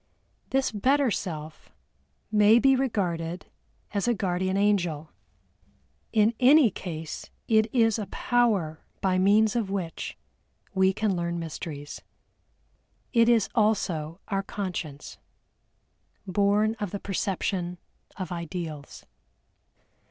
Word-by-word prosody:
This 270 Hz, 0 st, +1 dB
better 260 Hz, +5 st, +2 dB
self 155 Hz, -6 st, -5 dB, 0.6 s
may 210 Hz, +1 st, +6 dB
be 270 Hz, +2 st, +5 dB
regarded 180 Hz, -9 st, -2 dB, 0.5 s
as 200 Hz, +2 st, 0 dB
a 240 Hz, -, +3 dB
guardian 185 Hz, -1 st, -1 dB
angel, 180 Hz, -7 st, +1 dB, 1.0 s
in 215 Hz, +1 st, +3 dB
any 265 Hz, -2 st, +6 dB
case 160 Hz, -4 st, -6 dB, 0.2 s
it 220 Hz, -1 st, +3 dB
is 225 Hz, -3 st, +3 dB
a 205 Hz, -, -4 dB
power 210 Hz, -11 st, 0 dB, 0.2 s
by 185 Hz, -2 st, +1 dB
means 210 Hz, +3 st, +4 dB
of 225 Hz, -5 st, 0 dB
which 185 Hz, -4 st, -4 dB, 0.6 s
we 190 Hz, -1 st, +4 dB
can 205 Hz, 0 st, 0 dB
learn 170 Hz, 0 st, -2 dB
mysteries. 155 Hz, -3 st, -6 dB, 1.1 s
It 230 Hz, -1 st, +5 dB
is 225 Hz, -4 st, +4 dB
also 180 Hz, -7 st, 0 dB
our 195 Hz, -2 st, 0 dB
Conscience, 180 Hz, -8 st, -6 dB, 1.1 s
born 205 Hz, +3 st, +2 dB
of 205 Hz, -2 st, -2 dB
the 200 Hz, -, -5 dB
perception 185 Hz, -2 st, -2 dB, 0.4 s
of 185 Hz, -3 st, -5 dB
Ideals. 170 Hz, -3 st, -6 dB
195 Hz, 105 wpm, -27 LUFS, 170-220 Hz, 1.1 s, may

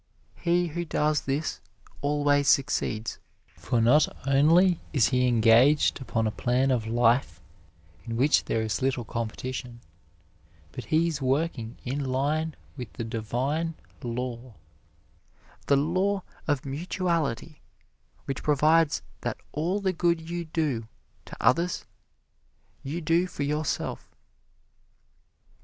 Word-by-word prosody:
He 175 Hz, 0 st, +1 dB
who 175 Hz, +3 st, -3 dB
does 150 Hz, -2 st, +1 dB
this 140 Hz, +3 st, -2 dB, 0.4 s
always 145 Hz, -1 st, +2 dB
succeeds, 120 Hz, -5 st, +1 dB, 0.4 s
for 85 Hz, +9 st, -1 dB
not 125 Hz, +7 st, +5 dB, 0.2 s
only 165 Hz, +6 st, +5 dB
is 135 Hz, -7 st, +4 dB
he 125 Hz, -1 st, +2 dB
engaged 120 Hz, +6 st, +4 dB
upon 115 Hz, -3 st, -1 dB
a 110 Hz, -, 0 dB
plan 125 Hz, +5 st, +1 dB
of 115 Hz, -4 st, 0 dB
life 120 Hz, +2 st, +2 dB, 0.7 s
in 115 Hz, 0 st, -4 dB
which 140 Hz, +5 st, +3 dB
there 110 Hz, -, 0 dB
is 105 Hz, -4 st, -2 dB
little 130 Hz, -3 st, 0 dB
competition, 120 Hz, +2 st, -5 dB, 0.9 s
but 125 Hz, -, -7 dB
he 160 Hz, +9 st, +2 dB
is 155 Hz, -4 st, -3 dB
working 130 Hz, -4 st, -1 dB
in 135 Hz, +3 st, -2 dB
line 145 Hz, +4 st, -1 dB, 0.2 s
with 125 Hz, -5 st, -9 dB
a -, -, -1 dB
divine 130 Hz, +9 st, -2 dB, 0.3 s
law, 120 Hz, -1 st, -5 dB, 1.1 s
the 140 Hz, -, +4 dB
law 185 Hz, +6 st, +1 dB, 0.2 s
of 145 Hz, -3 st, 0 dB
mutuality, 160 Hz, -2 st, -2 dB, 0.6 s
which 135 Hz, -, -4 dB
provides 155 Hz, +2 st, +3 dB, 0.2 s
that -, -, -3 dB
all 170 Hz, +7 st, -1 dB
the 190 Hz, -2 st, 0 dB
good 170 Hz, -1 st, 0 dB
you 175 Hz, -1 st, -3 dB
do 150 Hz, -8 st, -2 dB, 0.4 s
to -, -, -10 dB
others, 170 Hz, +9 st, +2 dB, 1.0 s
you 155 Hz, +6 st, -4 dB
do 170 Hz, +3 st, +2 dB
for 145 Hz, -, -4 dB
yourself. 150 Hz, +1 st, -2 dB
140 Hz, 120 wpm, -27 LUFS, 120-160 Hz, 1.1 s, not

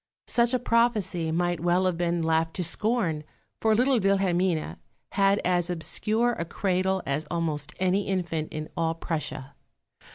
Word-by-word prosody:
Such 235 Hz, 0 st, +3 dB
a -, -, +4 dB
prophecy 230 Hz, -9 st, +1 dB
might 175 Hz, +1 st, 0 dB
well 175 Hz, +2 st, +2 dB
have 185 Hz, -2 st, +1 dB
been 170 Hz, 0 st, 0 dB
laughed 160 Hz, 0 st, +1 dB
to 180 Hz, -, -1 dB
scorn, 180 Hz, -3 st, 0 dB, 0.4 s
for 220 Hz, -1 st, +3 dB
little 250 Hz, +2 st, +3 dB
Wilhelmine 185 Hz, -, +1 dB, 0.3 s
had 195 Hz, 0 st, +3 dB
as 180 Hz, -1 st, +2 dB
obscure 215 Hz, +7 st, 0 dB
a 170 Hz, -, -3 dB
cradle 190 Hz, +2 st, 0 dB
as 140 Hz, +3 st, -2 dB
almost 150 Hz, -3 st, -2 dB
any 190 Hz, +2 st, +1 dB
infant 170 Hz, -5 st, -2 dB
in 155 Hz, 0 st, -5 dB
all 165 Hz, -1 st, 0 dB
Prussia. 150 Hz, -4 st, -4 dB
175 Hz, 150 wpm, -27 LUFS, 165-195 Hz, 0.4 s, a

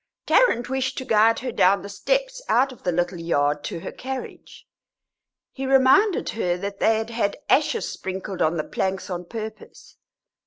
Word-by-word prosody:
Tarrant 240 Hz, -, +3 dB
wished 265 Hz, 0 st, -2 dB
to 260 Hz, -, -4 dB
guide 225 Hz, -1 st, +4 dB
her 255 Hz, -1 st, -3 dB
down 195 Hz, -2 st, +3 dB
the -, -, -6 dB
steps, -, -, -1 dB
out 265 Hz, +2 st, +3 dB
of 255 Hz, -, -14 dB
the 180 Hz, -, 0 dB
little 175 Hz, +1 st, -1 dB
yard, 145 Hz, -3 st, 0 dB
to 165 Hz, -, -5 dB
her -, -, -6 dB
carriage; 265 Hz, 0 st, -8 dB, 0.9 s
he 270 Hz, 0 st, -5 dB
reminded 270 Hz, +10 st, +4 dB
her 180 Hz, -5 st, -1 dB
that 200 Hz, +2 st, -6 dB
they 220 Hz, 0 st, +3 dB
had 220 Hz, +1 st, -4 dB
had 225 Hz, -3 st, -1 dB
ashes 305 Hz, -, +2 dB
sprinkled 190 Hz, 0 st, -5 dB
on 160 Hz, +1 st, +2 dB
the 155 Hz, -, -1 dB
planks 190 Hz, +3 st, -3 dB
on 180 Hz, 0 st, -4 dB
purpose. 220 Hz, +2 st, -9 dB
220 Hz, 170 wpm, -23 LUFS, 180-265 Hz, 0.9 s, guide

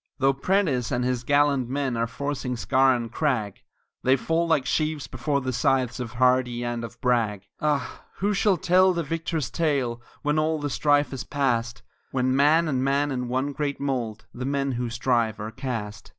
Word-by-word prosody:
Though 135 Hz, +1 st, +3 dB
Prentiss 140 Hz, -, 0 dB
and 125 Hz, -1 st, 0 dB
his 125 Hz, -1 st, -1 dB
gallant 140 Hz, -2 st, +2 dB
men 135 Hz, -2 st, -1 dB
are 115 Hz, 0 st, 0 dB
forcing 125 Hz, +1 st, -3 dB
scaur 130 Hz, +2 st, +3 dB
and 115 Hz, -2 st, -4 dB
crag, 120 Hz, -11 st, -1 dB, 0.4 s
They 130 Hz, +1 st, +4 dB
fall 165 Hz, +6 st, 0 dB
like 155 Hz, -5 st, +2 dB
sheaves 155 Hz, 0 st, -1 dB
before 140 Hz, +3 st, -2 dB
the 130 Hz, -1 st, -2 dB
scythes 130 Hz, 0 st, +1 dB
of 120 Hz, -3 st, -5 dB
Hardee 125 Hz, -1 st, +2 dB
and 120 Hz, -1 st, -3 dB
of 115 Hz, +1 st, -8 dB
Bragg; 115 Hz, -5 st, +1 dB, 0.2 s
Ah, 145 Hz, -4 st, -1 dB
who 205 Hz, +2 st, 0 dB
shall 200 Hz, -1 st, +2 dB
tell 185 Hz, +2 st, +4 dB
the 170 Hz, -1 st, -1 dB
victor's 165 Hz, -2 st, -3 dB
tale 135 Hz, -8 st, 0 dB, 0.2 s
when 150 Hz, +1 st, +1 dB
all 155 Hz, +1 st, +1 dB
the 145 Hz, -1 st, -3 dB
strife 145 Hz, +1 st, +2 dB
is 135 Hz, 0 st, -4 dB
past, 120 Hz, -5 st, -1 dB, 0.3 s
When 130 Hz, 0 st, +1 dB
man 155 Hz, +4 st, +4 dB
and 130 Hz, -4 st, 0 dB
man 140 Hz, +2 st, +1 dB
in 125 Hz, -2 st, -2 dB
one 130 Hz, +3 st, -1 dB
great 145 Hz, -1 st, -2 dB
mould 120 Hz, -6 st, -3 dB
the 125 Hz, -, -6 dB
men 140 Hz, 0 st, 0 dB
who 120 Hz, -1 st, -2 dB
strive 115 Hz, -2 st, 0 dB
are 105 Hz, +2 st, -5 dB
cast. 110 Hz, -4 st, -5 dB
130 Hz, 185 wpm, -25 LUFS, 120-145 Hz, 0.4 s, They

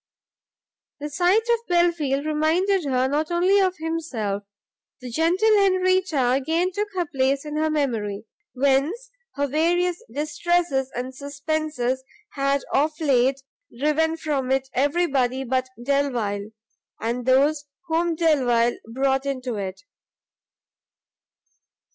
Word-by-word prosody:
The 295 Hz, +1 st, -5 dB
sight 360 Hz, +8 st, +3 dB
of 470 Hz, -1 st, +3 dB
Belfield 335 Hz, -6 st, +1 dB
reminded 325 Hz, +5 st, +1 dB
her 260 Hz, -1 st, +1 dB
not 300 Hz, +3 st, -1 dB
only 360 Hz, +3 st, +3 dB
of 370 Hz, -2 st, +1 dB
himself; 305 Hz, -12 st, -3 dB, 0.6 s
the 250 Hz, -2 st, -8 dB
gentle 360 Hz, -, +3 dB
Henrietta 370 Hz, -8 st, +2 dB
again 320 Hz, +8 st, +1 dB
took 415 Hz, +3 st, -2 dB
her 355 Hz, -2 st, 0 dB
place 275 Hz, -1 st, 0 dB
in 300 Hz, 0 st, -5 dB
her 315 Hz, 0 st, +1 dB
memory, 230 Hz, -9 st, -2 dB, 0.3 s
whence 280 Hz, -, +1 dB, 0.2 s
her 285 Hz, 0 st, 0 dB
various 345 Hz, -, +1 dB
distresses 300 Hz, -2 st, 0 dB
and 250 Hz, +2 st, -4 dB
suspences 280 Hz, -2 st, -2 dB, 0.3 s
had 275 Hz, 0 st, 0 dB
of 305 Hz, +2 st, +1 dB
late 270 Hz, -3 st, +2 dB, 0.3 s
driven 315 Hz, +4 st, +1 dB
from 285 Hz, -5 st, -2 dB
it 265 Hz, 0 st, 0 dB
everybody 270 Hz, -3 st, +1 dB
but 260 Hz, 0 st, -1 dB
Delvile, 240 Hz, -7 st, -1 dB, 0.5 s
and 235 Hz, +2 st, -3 dB
those 285 Hz, +3 st, +3 dB, 0.2 s
whom 335 Hz, 0 st, 0 dB
Delvile 250 Hz, -8 st, +2 dB
brought 270 Hz, +2 st, 0 dB
into 255 Hz, -3 st, -3 dB
it. 190 Hz, -1 st, -5 dB
285 Hz, 115 wpm, -23 LUFS, 260-335 Hz, 0.6 s, sight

